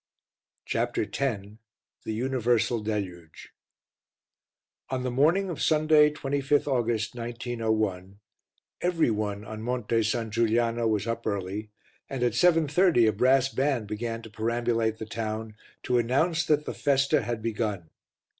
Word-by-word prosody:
CHAPTER - - -1
X - - -7 0.9
THE 110 - -2
UNIVERSAL 120 -1 +1
DELUGE 95 -6 -5 1.4
On 130 -1 -2
the 125 - -2
morning 160 +10 +3
of 165 - -6
Sunday, 155 -1 +4
25th 145 0 0
August, 120 -5 0
1901, 110 -5 -2 0.6
every 170 -8 +2
one 105 -1 -3
on 110 0 -7
Monte 120 -1 0
San 110 0 -1
Giuliano 115 +1 +1
was 105 -2 0
up 115 0 -3
early 100 +1 -3 0.4
and 130 -2 -3
at 120 - +3
7.30 160 - +4
a - - 0
brass 130 +4 +3
band 135 -4 0
began 115 +2 -4
to 110 - -11
perambulate 115 0 0
the 110 - -6
town 110 0 -4 0.3
to 125 -1 +2
announce 155 +8 +1
that 150 -1 +2
the - - -4
festa 140 -1 +2
had 115 -2 -4
begun. 105 -7 -3
115 Hz, 130 wpm, -27 LUFS, 110-135 Hz, 1.4 s, Sunday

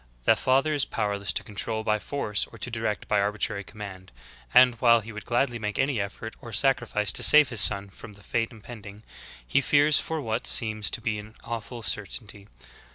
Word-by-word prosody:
The - - +4
father 135 +4 +1
is 145 -3 +1
powerless 100 -3 -2
to - - -2
control 110 0 -4
by 105 -1 0
force 105 -5 -2
or - - -14
to 125 - -5
direct 110 -2 -3
by 105 - +2
arbitrary 105 0 -2
command; 95 -3 -10 0.4
and, 125 - +6
while 115 -2 +5
he 115 +2 -10
would 105 -2 -9
gladly 120 0 0
make 105 -2 -4
any 135 -6 0
effort 110 +3 -7
or 120 -3 -10
sacrifice 110 -4 +1
to - - 0
save 150 -3 +7
his 115 -4 0
son 100 -1 +6
from 100 +2 -13
the 100 0 -17
fate 115 +1 -2
impending, 105 -2 -12 0.4
he 100 - +1
fears 145 +2 +4
for 160 -1 -4
what 115 -4 -3
seems 110 -2 +2
to - - -5
be 110 -2 -2
an 110 +2 -12
awful 115 0 -6
certainty. 105 0 -5
110 Hz, 195 wpm, -26 LUFS, 105-120 Hz, 0.4 s, save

